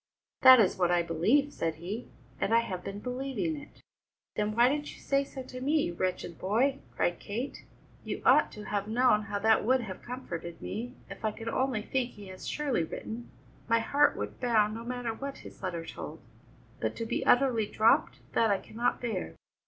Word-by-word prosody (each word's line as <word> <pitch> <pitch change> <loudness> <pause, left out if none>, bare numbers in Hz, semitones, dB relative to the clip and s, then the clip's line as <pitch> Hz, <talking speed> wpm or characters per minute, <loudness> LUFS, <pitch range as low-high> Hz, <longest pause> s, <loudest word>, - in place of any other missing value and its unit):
"That 260 -1 +10
is 200 -3 +3
what 175 -1 +3
I 175 -1 +3
believe," 220 - +2
said 165 -1 -1
he, 190 +9 -5 0.3
"and 225 - +2
I 230 - +6
have 185 -5 -5
been 200 0 -5
believing 270 +6 -2
it." 290 0 -12 0.5
"Then 210 0 -1
why 240 +1 +6
didn't 295 +2 -2
you - - -15
say 275 0 +1
so 270 -1 -8
to 255 0 -8
me, 295 +3 +2
you 175 - -2
wretched 175 -2 -3
boy?" 250 +8 +2 0.2
cried 175 - +1
Kate. 235 +7 -5 0.4
"You - - -5
ought - - +6
to 210 - -8
have 205 -1 -2
known 230 -1 +4
how 205 -1 -2
that 220 +2 +4
would 255 +3 +3
have 195 -5 -7
comforted 170 -9 -6
me. 245 +4 -5
If - - -10
I 220 - +2
could 225 +2 -6
only 250 -3 0
think 250 0 -1
he 205 -2 -11
has 185 0 -8
surely 280 - 0
written, 225 +8 -6 0.4
my 230 - +4
heart 285 +6 +3
would - - -5
bound, 215 -4 +3
no 225 +1 -6
matter 245 -1 -3
what 275 +4 -6
his - - -12
letter 170 -3 -3
told; 160 -1 -7 0.6
but 110 -1 -1
to 230 - -3
be - - -1
utterly 245 -4 +4
dropped, 220 +2 +3
that 225 - +3
I 200 - +3
cannot 235 +5 -2
bear." 225 -7 -3
225 Hz, 200 wpm, -30 LUFS, 195-255 Hz, 0.6 s, That